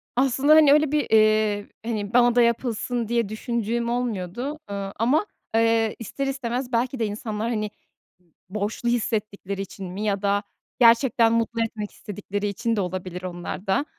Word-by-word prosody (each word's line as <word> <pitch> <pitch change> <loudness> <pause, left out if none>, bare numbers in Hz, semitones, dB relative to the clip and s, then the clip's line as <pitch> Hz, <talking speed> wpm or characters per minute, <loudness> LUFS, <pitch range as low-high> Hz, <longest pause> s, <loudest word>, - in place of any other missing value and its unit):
Aslında, 270 +4 +4
hani, 300 -3 +7
öyle 300 -1 +3
bir, 300 -3 +1
eee, 215 -1 +3 0.2
hani, 215 -2 -3
bana 240 -1 +5
da 245 - +6
yapılsın 235 0 0
diye 235 -2 0
düşündüğüm 235 +1 -2
olmuyordu. 240 - -3
Eee, 200 -1 -4
ama, 265 - +3 0.3
eee, 225 -1 +3
ister 275 +5 -4
istemez 255 -1 -3
belki 250 +2 0
de 225 - +1
insanlar, 215 +1 -3
hani, 215 -3 -1 0.8
borçlu 215 +4 -2
hissettikleri 210 -4 -2
için 195 0 -7
mi 200 +3 -5
ya 200 -2 0
da 200 0 +1 0.4
gerçekten 230 -1 +5
mutlu 230 0 0
etmek 210 -2 -5
istedikleri 205 0 -5
için 230 +3 -1
de 205 - 0
olabilir 180 0 -5
onlar 180 +2 -6
da. 275 +9 +2
225 Hz, 155 wpm, -24 LUFS, 205-240 Hz, 0.8 s, hani